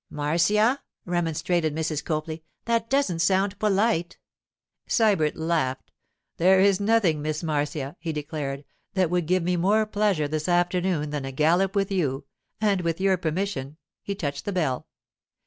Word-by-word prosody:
'Marcia,' 205 Hz, -, +2 dB, 0.2 s
remonstrated 170 Hz, -2 st, 0 dB
Mrs. 155 Hz, -2 st, -2 dB
Copley, 155 Hz, 0 st, -3 dB, 0.2 s
'that 230 Hz, -1 st, 0 dB
doesn't 270 Hz, -12 st, +1 dB
sound 195 Hz, +3 st, +1 dB
polite.' 205 Hz, -4 st, +1 dB, 0.7 s
Sybert 200 Hz, -10 st, +3 dB
laughed. 160 Hz, -6 st, -1 dB, 0.5 s
'There 185 Hz, +3 st, +5 dB
is 195 Hz, -1 st, +4 dB
nothing, 200 Hz, -7 st, +2 dB
Miss 155 Hz, +2 st, -3 dB
Marcia,' 150 Hz, -2 st, -2 dB
he 165 Hz, -1 st, -3 dB
declared, 145 Hz, -2 st, -4 dB, 0.3 s
'that 185 Hz, -3 st, +2 dB
would 175 Hz, -3 st, 0 dB
give 185 Hz, 0 st, +2 dB
me 180 Hz, +1 st, 0 dB
more 205 Hz, +5 st, +3 dB
pleasure 205 Hz, -7 st, +1 dB
this 155 Hz, +3 st, -2 dB
afternoon 175 Hz, -3 st, +1 dB
than 145 Hz, -2 st, -3 dB
a 135 Hz, -, -4 dB
gallop 175 Hz, +8 st, +2 dB
with 200 Hz, 0 st, +1 dB
you; 140 Hz, -7 st, -1 dB, 0.3 s
and 205 Hz, -3 st, +2 dB
with 165 Hz, 0 st, -1 dB
your 190 Hz, 0 st, +3 dB
permission——' 160 Hz, -4 st, -3 dB, 0.2 s
he 200 Hz, -, -4 dB
touched 145 Hz, -6 st, -4 dB
the 205 Hz, -, -2 dB
bell. 155 Hz, -9 st, -1 dB
175 Hz, 145 wpm, -25 LUFS, 155-195 Hz, 0.7 s, There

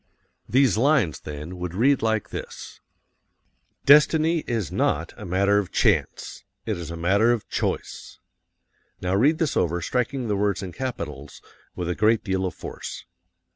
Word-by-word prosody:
These 130 Hz, -5 st, +3 dB
lines, 130 Hz, -, +2 dB
then, 75 Hz, +4 st, -8 dB
would 90 Hz, -1 st, -5 dB
read 135 Hz, +6 st, +3 dB
like 110 Hz, -2 st, 0 dB
this: -, -, -8 dB, 1.1 s
"DESTINY 155 Hz, +3 st, +5 dB
is 110 Hz, -9 st, -2 dB
NOT 80 Hz, +3 st, 0 dB
a 105 Hz, -, -9 dB
matter 100 Hz, +3 st, +2 dB
of 100 Hz, -, -4 dB
CHANCE. -, -, 0 dB, 0.2 s
It 110 Hz, -, -1 dB
is 85 Hz, -3 st, -7 dB
a 85 Hz, -, -6 dB
matter 100 Hz, +7 st, +3 dB
of 120 Hz, -3 st, -2 dB
CHOICE." -, -, -4 dB, 0.8 s
Now 90 Hz, +1 st, -2 dB
read 140 Hz, +11 st, +3 dB
this 160 Hz, -3 st, -1 dB
over, 85 Hz, 0 st, +1 dB
striking 125 Hz, -, -2 dB
the 105 Hz, -, 0 dB
words 100 Hz, -1 st, 0 dB
in 95 Hz, -, -6 dB
capitals 80 Hz, -, -6 dB, 0.4 s
with 90 Hz, -, -4 dB
a 90 Hz, -, 0 dB
great 110 Hz, +3 st, +2 dB
deal 95 Hz, -2 st, -1 dB
of -, -, -7 dB
force. -, -, -8 dB
100 Hz, 155 wpm, -24 LUFS, 90-125 Hz, 1.1 s, DESTINY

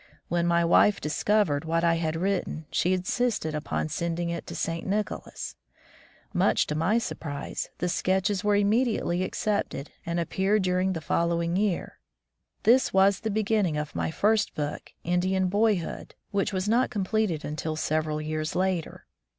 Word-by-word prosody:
When 170 Hz, 0 st, +1 dB
my 170 Hz, 0 st, +3 dB
wife 200 Hz, +4 st, +5 dB
discovered 155 Hz, -1 st, +1 dB
what 165 Hz, +1 st, 0 dB
I 170 Hz, -1 st, +4 dB
had 160 Hz, -1 st, -1 dB
written, 180 Hz, -3 st, -1 dB
she 180 Hz, -, +1 dB
insisted 185 Hz, -2 st, 0 dB
upon 150 Hz, +1 st, -2 dB
send 170 Hz, +2 st, -2 dB
ing 170 Hz, -1 st, -1 dB
it 170 Hz, -, -5 dB
to -, -, -6 dB
St. 165 Hz, 0 st, -2 dB
Nicholas. 210 Hz, +1 st, -3 dB, 0.8 s
Much -, -, +3 dB
to -, -, -3 dB
my 165 Hz, +9 st, +2 dB
surprise, 150 Hz, -10 st, -4 dB
the 180 Hz, -, -1 dB
sketches 190 Hz, +3 st, 0 dB
were 205 Hz, 0 st, +3 dB
immediately 205 Hz, -3 st, +2 dB
accepted 195 Hz, -7 st, -2 dB
and 170 Hz, 0 st, -2 dB
appeared 190 Hz, +4 st, +1 dB
during 185 Hz, +1 st, +1 dB
the 165 Hz, -, -4 dB
following 170 Hz, +1 st, 0 dB
year. 195 Hz, -2 st, -1 dB, 0.6 s
This 245 Hz, +4 st, +4 dB
was 195 Hz, 0 st, +4 dB
the 220 Hz, -, -3 dB
beginning 210 Hz, -6 st, +1 dB
of 150 Hz, 0 st, -4 dB
my -, -, -1 dB
first 210 Hz, +6 st, +1 dB
book, 150 Hz, -1 st, -4 dB
"Indian 185 Hz, +2 st, +1 dB
Boyhood," 205 Hz, -3 st, 0 dB, 0.2 s
which 200 Hz, 0 st, 0 dB
was 190 Hz, 0 st, -2 dB
not 235 Hz, +4 st, +3 dB
completed 205 Hz, -5 st, -1 dB
until 155 Hz, +1 st, -3 dB
several 155 Hz, 0 st, -1 dB
years 155 Hz, 0 st, -3 dB
later. 185 Hz, -3 st, -1 dB
180 Hz, 155 wpm, -27 LUFS, 165-205 Hz, 0.8 s, wife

